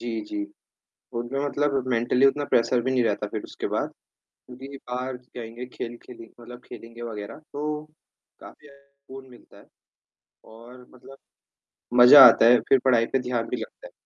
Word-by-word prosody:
जी, 115 -2 -4
जी। 310 -1 -5 0.7
उनमें 120 +3 -4
मतलब 140 -2 -1
मेंटली 125 +2 +2
उतना 145 +1 0
प्रेशर 120 +1 +2
भी 130 - -2
नहीं 130 -1 +1
रहता 105 -1 -1
फिर 105 0 -6
उसके - - -6
बाद। - - -2 0.6
क्योंकि 135 +2 -11
बाहर 125 +1 -4
जाएँगे, 120 -1 -10
खेल 120 -1 -8
खेलें 115 -2 -13
मतलब 120 +1 -12
खेलेंगे 115 +1 -12
वगैरह 110 +2 -8
तो 150 +1 -4 0.6
काफ़ी 150 - -15
ज़्यादा 140 0 -19
सुकून 135 -1 -14
मिलता 120 - -18
है - - -19 0.8
और 120 +3 -15
मतलब 135 +2 -16 0.8
मज़ा 135 +3 +10
आता - - +6
है, 120 +1 +6
फिर 135 - +5
पढ़ाई 120 -3 +3
पे 135 - -1
ध्यान 125 -2 -3
भी - - -3
लगता - - -10
है। - - -14
125 Hz, 165 wpm, -24 LUFS, 115-135 Hz, 0.8 s, मज़ा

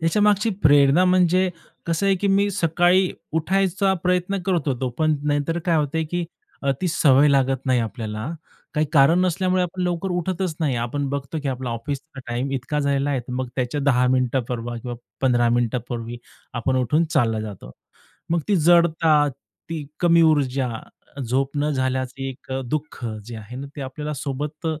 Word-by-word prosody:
ह्याच्या 165 +6 +2
मागची 210 +2 +3
प्रेरणा 145 +3 +5
म्हणजे 185 0 +3 0.4
कसं 170 +4 0
आहे 195 - +4
की 200 - -1
मी 200 +1 +3
सकाळी 175 +1 +3 0.2
उठायचा 190 +4 +1
प्रयत्न 180 +2 +1
करत 175 -6 +1
होतो, 130 -1 -1
पण 155 -1 +2
नाहीतर 145 +3 0
काय 170 -2 +2
होत, 150 0 0
की 175 -1 -1 0.4
अ, 140 - +1
ती 185 - 0
सवय 145 -3 +5
लागत 135 -1 +1
नाही 130 -2 +3
आपल्याला. 110 -1 -4 0.5
काही 155 0 +1
कारण 155 +4 +5
नसल्यामुळे 185 0 +1
आपण 180 +1 -3
लवकर 180 +1 -1
उठतच 180 0 -1
नाही 145 -5 +1
आपण 130 +4 -2
बघतो, 140 +2 -3
की 145 - -2
आपला 130 -1 -3
ऑफिसचा 135 +5 -5
टाईम 120 +3 -2
इतका 135 +3 -2
झालेला 140 0 +1
आहे, 135 - 0
मग 125 0 -3
त्याच्या 130 +3 -1
10 125 -3 +3
मिनिटापर्वी 125 -2 -1
किंवा 120 +1 -5 0.3
15 120 -3 +3
मिनिटांपूर्वी 120 0 -2 0.4
आपण 130 +2 0
उठून 130 +6 +2
चालला 115 -6 +2
जातो. 105 - -8 0.6
मग 170 0 +2
ती 205 - +3
जडता, 160 -2 +4
ती 140 +5 -9 0.2
कमी 170 -1 +5
ऊर्जा, 140 -5 +2 0.5
झोप 135 +4 -1
न 150 +1 +1
झाल्याचं 130 -1 -2
एक 135 0 -6
अ, 130 - -1
दुःख, 150 0 -4 0.2
जे 120 +1 -8
आहे 110 +3 -9
ना, 140 - -6
ते - - -5
आपल्याला 150 +3 -5
सोबत 150 +4 -4
145 Hz, 165 wpm, -23 LUFS, 130-170 Hz, 0.6 s, प्रेरणा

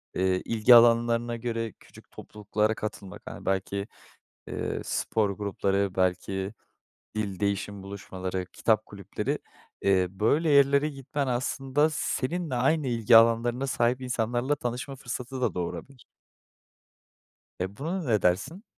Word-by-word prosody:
eee, 95 0 +1
ilgi 115 +2 +6
alanlarına 120 0 +4
göre 115 -1 -3
küçük - - -18
topluluklara 105 +1 -2
katılmak 100 -4 -6
hani, - - -9
belki, 95 +1 -1 0.6
eee, - - -3
spor 110 -2 0
grupları, 100 -1 -1
belki 95 +2 -1 0.6
dil 100 -3 -3
değişim 100 -1 -2
buluşmaları, 95 -2 -5
kitap 110 -2 +1
kulüpleri. 100 -3 -4 0.4
Eee, 95 -2 +3
böyle 115 - +1
yerlere 140 +1 +5
gitmen 140 0 -4
aslında 135 +4 +1
seninle 155 +1 -2
aynı 135 +4 +2
ilgi 115 -1 +5
alanlarına 115 +3 +3
sahip 125 0 +1
insanlarla 125 +2 0
tanışma 125 +1 -4
fırsatı 125 +1 -6
da 125 - +1
doğurabilir. 120 +9 -6 1.5
E, 95 +3 -4
buna 170 +6 -3
ne 110 - +1
dersin? 105 - 0
115 Hz, 120 wpm, -27 LUFS, 100-130 Hz, 1.5 s, ilgi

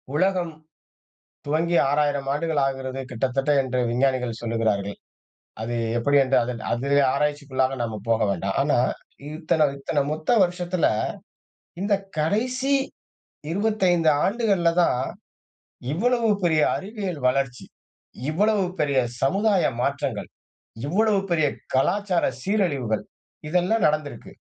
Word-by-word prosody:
உலகம் 180 0 +1 0.9
துவங்கி 165 +4 +1
6000 145 -1 0
ஆண்டுகள் 155 0 0
ஆகிறது. 135 -1 -4
கிட்டத்தட்ட 135 +3 -1
என்று 130 -1 -1
விஞ்ஞானிகள் 125 -2 0
சொல்கிறார்கள். 110 -4 -1 0.7
அது 120 +2 -3 0.2
எப்படின்னு 135 +2 +3 0.3
அதில 140 +4 +1
ஆராய்ச்சிக்குள்ளாக 140 -2 0
நாம 115 -2 -3
போக 115 0 +2
வேண்டாம். 95 +1 -2
ஆனா, 145 -1 +2 0.6
இத்தனை, 155 -1 +1
இத்தனை 145 +2 -1
மொத்த 155 0 -5
வருஷத்தில. 180 -1 0 0.9
இந்த 200 +1 +1 0.3
கடைசி 250 - 0 0.8
25 185 -4 +2
ஆண்டுகள்ல 200 -5 +2
தான் 125 -6 +1 0.9
இவ்வளவு 235 +6 +1
பெரிய 160 -3 +3
அறிவியல் 195 -5 -5
வளர்ச்சி, 130 -1 -1 0.7
இவ்வளவு 205 +4 +2 0.2
பெரிய 140 -2 +2 0.2
சமுதாய 195 +6 +2 0.2
மாற்றங்கள், 140 -5 -2 0.6
இவ்வளவு 205 +6 +2
பெரிய 155 -4 +3 0.3
கலாச்சார 180 +6 +1 0.2
சீரழிவுகள், 145 - 0 0.4
இதெல்லாம் 180 +6 +1
நடந்து 150 -1 +1
இருக்கு. - - -12
150 Hz, 100 wpm, -24 LUFS, 130-185 Hz, 0.9 s, எப்படின்னு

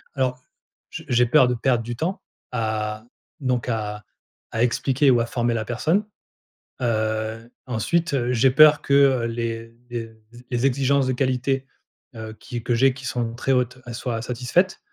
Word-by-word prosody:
Alors 130 -1 -1 0.5
je - - -7
j'ai 125 0 +3
peur 125 +1 +5
de 125 - +1
perdre 120 -1 +1
du 120 0 -5
temps 175 +7 -3 0.3
à 110 -2 -2 0.4
donc 125 -2 -1
à 105 -3 -3 0.5
à 110 - -1
expliquer 135 +3 +2
ou 120 -2 +4
à 115 - 0
former 120 0 -1
la 110 -1 -1
personne. 160 - 0 0.8
Heu, 110 0 -1 0.2
ensuite, 150 +8 0
heu, 125 -1 0
j'ai 125 +3 +4
peur 150 +1 +7
que, 140 - -1
heu, 135 -4 +5
les 115 0 -4 0.2
les 115 -2 -5 0.4
les 120 +2 0
exigences 135 0 +2
de 130 - +1
qualité, 130 +1 0 0.5
heu, 110 -1 -7
qui 120 -2 -6
que 120 - 0
j'ai 130 +2 +4
qui 130 -1 -10
sont 120 -2 -2
très 135 +2 -1
hautes, 125 0 0
elles 120 -1 -6
soient 120 -3 -3
satisfaites. 125 +10 0
125 Hz, 170 wpm, -23 LUFS, 115-135 Hz, 0.8 s, peur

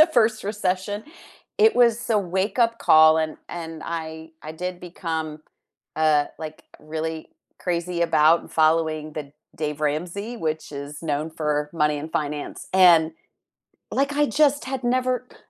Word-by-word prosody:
the 310 - +8
first 220 -1 +4
recession, 200 0 -1 0.6
it 440 0 +6
was 240 -2 +5
a 220 -2 +3
wake-up 205 +5 0
call, 155 0 +7
and 155 -1 -2
and 165 -2 -7
I 160 -1 -5
I 155 - -7
did 180 +2 -5
become, 165 -3 -4 0.7
uh, 155 -2 +3
like, 155 -1 -8 0.2
really 160 +1 -4 0.4
crazy 175 0 -2
about 160 0 +3
following 155 -1 +2
the 145 -2 -6 0.2
Dave 150 -1 -3
Ramsey, 175 +10 -2
which 155 -6 -3
is 145 +2 -7
known 155 0 -2
for 150 -2 -1
money 150 -2 +1
and 155 +2 -7
finance, 150 -1 -4
and, 175 -4 +6 0.8
like, 275 +1 +1
I 295 - +3
just 290 -1 +2
had 265 0 -4
never 255 0 0
c - - -18
165 Hz, 145 wpm, -24 LUFS, 155-205 Hz, 0.8 s, the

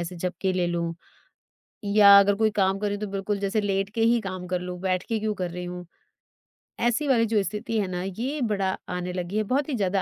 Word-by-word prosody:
ऐसे 175 +1 -5
झपकी 185 +2 -2
ले 180 -1 0
लूँ 170 -1 -2 1.0
या 200 -1 +9
अगर 200 0 +3
कोई 220 +1 +2
काम 195 -1 +1
कर 210 - -1
रही 205 - -2
तो 210 +1 -4
बिल्कुल 200 +1 -3
जैसे 200 +2 0
लेट 195 -1 -1
के 225 - 0
ही 230 +1 +4
काम 185 -2 -6
कर 180 0 -1
लूँ, 180 0 -6
बैठ 185 -1 0
के 225 -1 0
क्यों 215 0 -1
कर 180 -2 -3
रही 180 0 -6
हूँ। 180 0 -7 0.9
ऐसी 240 +5 +1
वाली 240 -4 +4
जो 215 -2 +2
स्थिति 215 +3 -3
है 200 - 0
ना, 180 0 -3
यह 245 +10 -3
बड़ा 195 -3 -1
आने 180 0 -3
लगी 180 +3 -3
है। 215 - +2
बहुत 270 +7 -1
ही 270 - -1
ज़्यादा 195 -3 0
195 Hz, 235 wpm, -25 LUFS, 180-215 Hz, 1.0 s, या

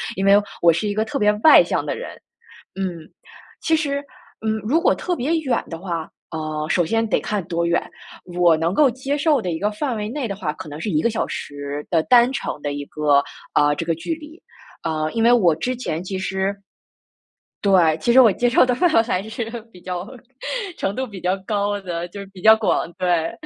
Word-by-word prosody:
因 195 - -2
为 195 0 +6 0.3
我 170 -1 +6
是 170 +6 -1
一 205 - -1
个 215 +1 +1
特 280 +5 -4
别 210 -3 +4
外 315 - +9
向 - - -1
的 - - -3
人。 - - -7 0.6
嗯， 180 -4 -5 0.5
其 320 - +2
实， 280 -3 -1 0.4
嗯， 220 0 +1
如 285 +10 +2
果 - - +4
特 360 - -2
别 280 -1 -3
远 260 -5 0
的 165 - -5
话， 170 -3 -4 0.2
呃， 155 -1 -3
首 175 - +2
先 225 +5 0
得 - - +1
看 210 -2 -2
多 170 0 -1
远， 170 0 +1 0.5
我 175 -2 +5
能 165 +4 -1
够 290 -4 +5
接 265 +4 -3
受 295 -3 +2
的 180 - -3
一 160 - -3
个 210 - +1
范 235 +3 -3
围 210 0 -3
内 265 +2 -3
的 200 - -3
话， 165 -6 -3
可 - - -9
能 145 +1 -7
是 205 - -2
1 150 - +2
个 235 - +2
小 225 -1 -1
时 145 0 -6
的 165 -3 +3
单 245 0 +5
程 270 - -4
的 145 - -2
一 145 0 -5
个， 145 -2 +2 0.3
啊， 145 0 +3
这 165 - -4
个 165 - +1
距 165 - -4
离。 315 +2 -13 0.4
啊， 155 -1 -1
因 225 - 0
为 240 - +6
我 185 -10 +4
之 255 +9 -2
前 170 -10 -3
其 190 0 -4
实 190 +1 -1 1.1
对， 180 -6 +4
其 235 +9 +1
实 260 - +8
我 230 -5 +7
接 245 +6 +1
受 240 - +5
的 250 - +1
范 350 +6 +2
围 225 - +6
还 225 -5 -1
是 220 +2 -5 0.3
比 180 - -15
较 180 +1 -5 0.7
程 195 - -1
度 260 - -1
比 200 -5 -9
较 180 +2 0
高 205 -1 0
的， 175 -2 -4
就 200 +3 -9
是 200 - -8
比 185 - -12
较 220 +1 +8
广， 215 -5 0
对， 175 -2 0
195 Hz, 240 characters per minute, -21 LUFS, 165-235 Hz, 1.1 s, 外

